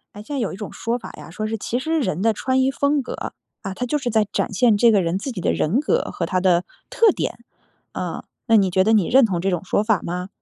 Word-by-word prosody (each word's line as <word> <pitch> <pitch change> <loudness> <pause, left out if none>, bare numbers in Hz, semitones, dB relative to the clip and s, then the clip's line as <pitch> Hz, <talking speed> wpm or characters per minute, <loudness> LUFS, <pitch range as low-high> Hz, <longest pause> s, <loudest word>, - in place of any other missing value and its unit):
哎， 205 - -8
现 285 +7 -6
在 - - -1
有 225 - -1
一 - - -7
种 210 -1 -7
说 235 +2 -2
法 240 - -9
呀， - - -11
说 215 +6 -4
是 225 0 -3
其 240 +4 -2
实 320 +4 0
人 185 - -2
的 225 +1 +3
穿 260 +4 0
衣 260 - +3
风 280 +1 +1
格， 250 - -6 0.3
啊， 195 -2 -5
它 250 - -3
就 275 +5 0
是 260 -4 -3
在 220 -2 +2
展 - - -1
现 220 +2 +4
这 230 +3 +5
个 205 -3 +4
人 170 +1 -1
自 260 +7 -4
己 220 - -6
的 - - 0
人 190 +12 +1
格 300 - 0
和 170 - -2
他 185 +2 0
的 180 -1 +3 0.2
特 460 -4 +4
点。 - - -4 0.5
啊， - - -4 0.2
那 225 - +5
你 195 -2 +3
觉 185 +1 +3
得 220 - +4
你 205 -6 +3
认 265 0 +5
同 185 -5 -1
这 195 - 0
种 180 -2 -2
说 205 - +1
法 215 -4 +1
吗？ 180 +2 -4
215 Hz, 300 characters per minute, -22 LUFS, 190-255 Hz, 0.5 s, 这